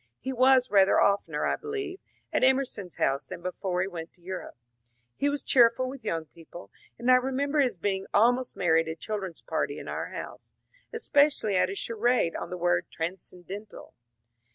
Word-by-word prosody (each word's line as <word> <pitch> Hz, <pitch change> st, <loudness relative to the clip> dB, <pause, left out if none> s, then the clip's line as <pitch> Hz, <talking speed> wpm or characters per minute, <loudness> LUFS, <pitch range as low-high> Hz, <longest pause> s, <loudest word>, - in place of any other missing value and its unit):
He 265 Hz, -, -4 dB
was 255 Hz, 0 st, +4 dB
rather 195 Hz, -1 st, +5 dB
of 200 Hz, 0 st, +3 dB
tener, 150 Hz, -2 st, -2 dB
I -, -, +1 dB
believe, 405 Hz, -3 st, -5 dB, 0.3 s
at -, -, +1 dB
Em 260 Hz, 0 st, +6 dB
erson's 205 Hz, -9 st, -5 dB
house 135 Hz, +1 st, +1 dB
than 175 Hz, -2 st, -8 dB
before 180 Hz, 0 st, -2 dB
he -, -, -2 dB
went 165 Hz, -3 st, -7 dB
to 180 Hz, -, -25 dB
Europe. 185 Hz, -7 st, -7 dB, 0.6 s
He 285 Hz, -, +1 dB
was 285 Hz, 0 st, -2 dB
cheer 240 Hz, -3 st, +6 dB
ful 255 Hz, +2 st, -3 dB
with 265 Hz, 0 st, -8 dB
young 165 Hz, -1 st, -2 dB
people, 165 Hz, +3 st, -13 dB, 0.3 s
and 240 Hz, +2 st, +2 dB
I 255 Hz, -, +8 dB
remember 270 Hz, +3 st, 0 dB
his 255 Hz, -8 st, +2 dB
being 190 Hz, +2 st, -2 dB
almost 245 Hz, +4 st, +3 dB
merry 165 Hz, -3 st, +3 dB
at 165 Hz, -, -7 dB
a 160 Hz, -, -4 dB
children's 195 Hz, -3 st, -5 dB
party -, -, -2 dB
in -, -, -8 dB
our -, -, -3 dB
house; -, -, -9 dB, 0.4 s
especially 290 Hz, -, +2 dB
at 185 Hz, 0 st, +3 dB
a 195 Hz, -, -4 dB
charade 230 Hz, -4 st, 0 dB
on -, -, -5 dB
the 180 Hz, -, -5 dB
word 175 Hz, 0 st, +1 dB
^^ -, -, -54 dB
transcendental." 185 Hz, +4 st, -7 dB
200 Hz, 195 wpm, -28 LUFS, 175-255 Hz, 0.6 s, I